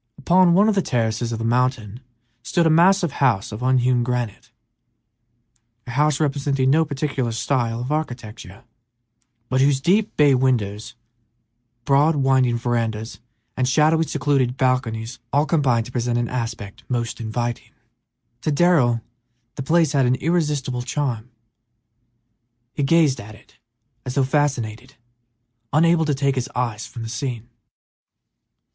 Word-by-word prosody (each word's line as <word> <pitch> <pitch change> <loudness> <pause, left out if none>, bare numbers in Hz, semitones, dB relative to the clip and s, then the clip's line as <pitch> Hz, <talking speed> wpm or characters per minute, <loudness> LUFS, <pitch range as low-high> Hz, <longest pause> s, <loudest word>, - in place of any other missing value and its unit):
Upon 180 -1 +4
one 205 +3 +5
of 220 - +3
the 195 - +1
terraces 115 -4 -1
of 115 - -3
the 115 - -4
mountain 120 -2 0 0.4
stood 170 +8 0
a 160 - +4
massive 175 +1 +4
house 125 -9 0
of 105 +3 -7
unhewn 125 -1 +2
granite, 120 -3 -3 1.4
a 125 - -7
house 150 +2 +1
representing 140 -3 0
no 160 +3 +4
particular 140 -4 -2
style 115 0 -1
of 125 +4 -4
architecture, 115 -10 -5 0.8
but 130 +2 +1
whose 135 0 +3
deep 195 +9 +1
bay 145 -2 +5
windows, 115 -4 -1 0.9
broad, 145 +3 +3
winding 130 -3 +2
verandas, 115 -2 -3 0.4
and 130 0 0
shadowy, 155 +4 +3
secluded 135 -5 0
balconies 125 -3 -1
all 145 +2 +2
combined 130 -9 +1
to 125 - -10
present 120 -1 -1
an 120 0 -1
aspect 115 -5 -5
most 120 -1 -3
inviting. 120 +2 -4 0.7
To 155 - -1
Darrell 140 -8 +3 0.5
the - - -6
place 160 +2 +2
had 135 -4 +2
an 125 - +2
irresistible 145 -4 -1
charm; 125 -3 -3 1.4
he - - -3
gazed 145 -1 +3
at 110 +1 -11
it 110 - -22 0.4
as 125 - -6
though 140 - +3
fascinated, 130 -3 -2 0.8
unable 165 +2 +3
to 150 -2 0
take 140 0 +1
his 130 +1 -3
eyes 120 -4 -2
from 115 - -8
the - - -5
scene. 120 -1 -5
130 Hz, 140 wpm, -21 LUFS, 120-145 Hz, 1.4 s, one